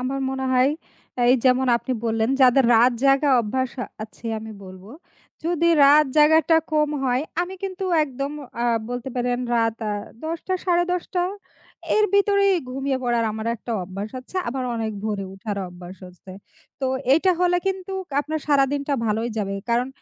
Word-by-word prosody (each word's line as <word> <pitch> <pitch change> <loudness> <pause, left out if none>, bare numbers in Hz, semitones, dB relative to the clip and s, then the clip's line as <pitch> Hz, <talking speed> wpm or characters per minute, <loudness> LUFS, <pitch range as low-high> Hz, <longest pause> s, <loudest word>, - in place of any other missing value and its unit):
আমার 265 +2 -2
মনে 265 0 -3
হয়, 255 +2 +4 0.6
এই 250 - +6
যেমন 260 0 +3
আপনি 255 - -4
বললেন, 225 +1 0
যাদের 260 0 +6
রাত 240 +3 +5
জায়গা 275 +2 +4
অভ্যাস, 250 +3 -2
আ - - -2 0.2
আছে 220 +1 -10
আমি 220 0 -8
বলব। 185 0 -12 0.6
যদি 340 0 +1 0.2
রাত 295 +2 +6
জায়গাটা 315 +1 +5 0.2
কম 300 -1 +2
হয় 250 +1 +1 0.2
আমি 365 +2 -6
কিন্তু 385 0 -4 0.2
একদম 275 0 -5 0.3
আ - - +1 0.3
বলতে 245 +1 -4
পারেন 245 0 0 0.2
রাত 225 -1 +1
আ - - -1 0.3
১০ঃ০০ 330 +1 -3
টা, 375 - +1
১০ঃ৩০ 355 0 +1
টা, 355 -1 +2 0.7
এর 425 - +4
ভিতরেই 400 -1 +4 0.2
ঘুমিয়ে 270 +1 -2
পড়ার 240 -2 +1
আমার 220 +1 -5
একটা 235 +1 -6
অভ্যাস 195 +4 -6
আছে। 255 +9 -11
আবার 255 +1 -3
অনেক 220 -1 -2
ভোরে 205 -2 -2
উঠার 200 +1 -5
অভ্যাস 180 +1 -11
হচ্ছে। 180 +1 -13 0.5
তো 265 - 0 0.3
এইটা 330 +6 +4
হলে 355 0 +3
কিন্তু 385 0 -2 0.3
আপনার 310 +1 -4
সারাদিনটা 280 0 +1
ভালোই 225 +2 -1
যাবে। 195 -2 -2 0.2
কারণ 240 +2 +1
260 Hz, 165 wpm, -23 LUFS, 225-310 Hz, 0.7 s, এই